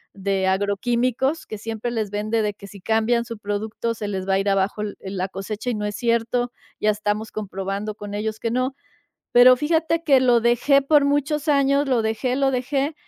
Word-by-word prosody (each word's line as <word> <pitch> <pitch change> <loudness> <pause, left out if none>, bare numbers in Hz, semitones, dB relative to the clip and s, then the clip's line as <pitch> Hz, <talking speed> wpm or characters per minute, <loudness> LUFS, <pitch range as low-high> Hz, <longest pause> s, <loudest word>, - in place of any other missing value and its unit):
de 195 -1 -1
agroquímicos 240 +9 0
que 215 - -7
siempre 225 +2 -4
les 220 -4 -2
vende 215 +2 -1
de 210 -1 -1
que 200 - -12
si 200 -1 -13
cambian 225 +2 +1
su 230 -2 -7
producto 210 +3 -3
se 210 -2 -5
les 190 -1 -4
va 195 - +2
a 195 - +3
ir 200 +1 0
abajo 195 +2 0
el 210 -1 -5
la 190 -1 -3
cosecha, 210 +5 -5
y 240 - -1
no 210 0 -3
es 205 0 -3
cierto, 235 +1 0 0.3
ya 215 - +2
estamos 210 +1 -1
comprobando 200 +1 -4
con 205 -1 -8
ellos 220 +1 -3
que 230 - -2
no. 255 +2 -1 0.6
Pero 250 +1 +8
fíjate 320 +3 0
que 275 -5 +5
lo 245 -2 +4
dejé 245 +4 +3
por 285 0 +4
muchos 290 +2 0
años, 280 -1 +3
lo 250 -4 +2
dejé, 225 +4 -1
lo 270 -1 +2
dejé 270 +4 -1
225 Hz, 200 wpm, -22 LUFS, 205-255 Hz, 0.6 s, Pero